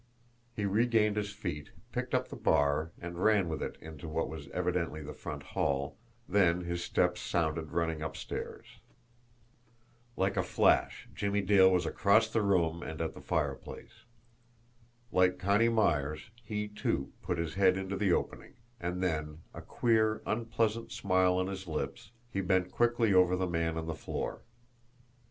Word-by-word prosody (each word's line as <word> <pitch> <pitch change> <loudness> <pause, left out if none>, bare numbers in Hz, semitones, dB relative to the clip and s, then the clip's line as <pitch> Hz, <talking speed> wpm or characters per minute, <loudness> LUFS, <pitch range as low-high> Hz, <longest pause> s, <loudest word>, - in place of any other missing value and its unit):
He 105 - -1
regained 105 +1 +3
his 105 -1 -1
feet, 90 -8 -5 0.2
picked - - -2
up - - 0
the - - -7
bar, 75 +1 +2
and 85 +1 -5
ran 105 -4 +4
with 80 - -3
it - - -4
into 80 -1 -9
what 80 +1 -1
was 75 -2 -7
evidently 85 -2 -1
the - - -7
front - - -7
hall 70 0 0 0.3
then 90 -3 +3
his 85 0 -3
steps 90 0 +1
sounded 80 -2 -1
running 80 -1 -1
upstairs. 80 0 -5 1.5
Like 95 +1 +1
a - - +4
flash, - - +2
Jimmie 100 0 0
Dale 95 -2 +6
was 90 -3 +2
across 110 +6 +3
the 110 - +1
room 85 -5 +2
and 80 -2 -6
at 80 - -2
the - - -11
fireplace. 70 -4 -4 1.1
Like 90 0 +3
Connie 100 +5 +3
Myers, 75 -6 0
he, 105 -1 -3
too, 105 -9 -2
put 90 - -2
his 85 -1 -2
head 95 0 +4
into 95 0 -3
the 100 -2 +1
opening; - - -2 0.2
and 90 0 -3
then, 80 -2 -2
a - - -8
queer, 110 -2 +1
unpleasant 115 0 -1
smile 95 -1 +2
on 95 - +1
his 95 -1 -5
lips, 70 -4 -4 0.2
he 95 - -1
bent 95 -1 +1
quickly 120 -3 +2
over 90 -1 +5
the 95 0 0
man 85 -2 -1
on 80 - -3
the 80 - -3
floor. 80 - -4
90 Hz, 160 wpm, -31 LUFS, 80-100 Hz, 1.5 s, Dale